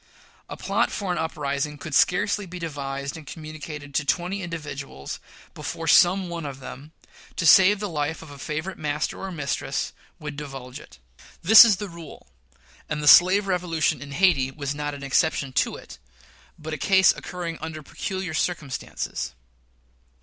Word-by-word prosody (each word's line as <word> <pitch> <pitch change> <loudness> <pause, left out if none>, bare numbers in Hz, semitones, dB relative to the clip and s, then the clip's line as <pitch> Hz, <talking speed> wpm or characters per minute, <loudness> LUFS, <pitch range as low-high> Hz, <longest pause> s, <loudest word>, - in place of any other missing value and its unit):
A - - -7
plot - - 0
for 195 -3 -3
an 175 - -1
uprising 150 -2 -2
could 155 +1 -8
scarcely 195 +6 +2
be 180 +1 -8
devised 140 -4 -4
and 160 -2 -11
communicated 155 -2 -8
to 150 - +1
twenty 180 +6 -1
individuals 150 - -6 0.3
before 165 0 -5
some 180 +4 +5
one 170 -1 -5
of 140 -2 -6
them, 135 +3 -10 0.4
to 165 - -2
save 190 +5 +7
the 205 - -2
life 160 -2 -3
of 155 - -12
a 140 - -11
favorite 155 +7 -4
master 150 0 -2
or 195 - -5
mistress, 140 -3 -3 0.3
would 150 -2 -6
divulge 135 -2 -7
it. 65 - -15 0.5
This 220 +6 +11
is 225 -4 +4
the 205 +2 -5
rule; 170 -4 -11 0.6
and 150 0 -2
the - - -1
slave 185 +6 +8
revolution 175 -4 0
in 145 -1 -8
Hayti 160 -6 +3
was 140 0 -4
not 145 0 -4
an 140 - -9
exception 140 -1 +1
to - - +1
it, - - -12 0.6
but 160 0 -6
a 155 - -4
case 190 +4 +5
occurring 170 -2 -6
under 155 -1 -6
peculiar 190 +3 -4
circumstances. 155 - -3
155 Hz, 165 wpm, -25 LUFS, 145-180 Hz, 0.6 s, This